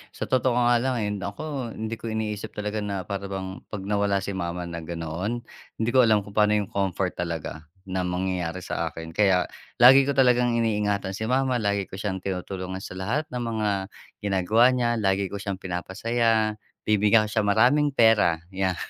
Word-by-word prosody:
Sa - - -4
totoo 130 -1 +2
nga 120 -1 +4
lang, 130 +1 0
eh, 105 - -1
naku 115 +6 -5
hindi 110 +1 -4
ko 115 - -6
iniisip 110 -1 -4
talaga 105 +1 -3
na 100 -3 -3
para 100 +2 -5
bang 95 -1 -5
'pag 100 -3 -6
nawala 100 -1 0
si 100 - -3
mama 90 -1 -3
na 85 -1 -5
ganoon, 85 +8 -4 0.3
hindi 115 +1 -1
ko 130 -2 +6
alam 105 -3 +3
kung 100 - -12
paano 105 0 +4
'yung 105 -1 -1
comfort 95 -1 -1
talaga 80 -2 -4 0.2
na 95 0 -1
mangyayari 90 -1 -2
sa - - -2
akin. 80 0 -8
Kaya 95 -3 +4 0.4
lagi 135 +2 +9
ko 140 - +2
talagang 125 -2 +4
iniingatan 105 -3 0
si 110 - -4
mama, 130 0 +1
lagi 100 -2 0
ko - - -8
siyang 95 -2 -2
tinutulungan 95 0 -4
sa - - -8
lahat 125 +11 -1
ng 125 -1 -3
mga 110 -2 -1 0.5
ginagawa 100 +4 +3
niya, 120 -1 +1
lagi 95 -1 +1
ko 100 - -5
siyang 100 -2 -3
pinapasaya, 110 +4 0 0.3
bibigyan 105 +1 +4
ko - - -9
siya - - +1
maraming 130 +8 +4
pera, 110 -9 +4 0.2
'yan 95 -2 0
105 Hz, 185 wpm, -25 LUFS, 95-115 Hz, 0.5 s, lagi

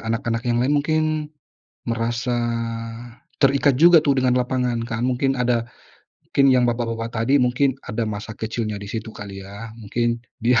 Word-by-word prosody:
anak-anak 115 0 -1
yang 120 - +2
lain 130 +4 +2
mungkin 155 +1 +1 0.8
merasa 120 +1 -1 1.0
terikat 140 -1 +3
juga 170 +2 +7
tuh, 140 -2 +2
dengan 125 -1 +3
lapangan 125 -1 0
kan, 115 +1 -2
mungkin 135 +1 +1
ada 120 -2 +1 0.7
mungkin 140 -1 +6
yang 125 -1 +4
bapak-bapak 115 -1 -2 0.2
tadi, 135 +3 +4
mungkin 125 +2 +2 0.2
ada 115 +2 -1
masa 110 0 -5
kecilnya 110 -1 -3
di 100 - -7
situ, 110 +2 -5
kali 100 -1 -8
ya. 100 +3 -9
Mungkin, 115 +2 -1 0.2
dia 120 -1 +5
120 Hz, 155 wpm, -22 LUFS, 115-130 Hz, 1.0 s, juga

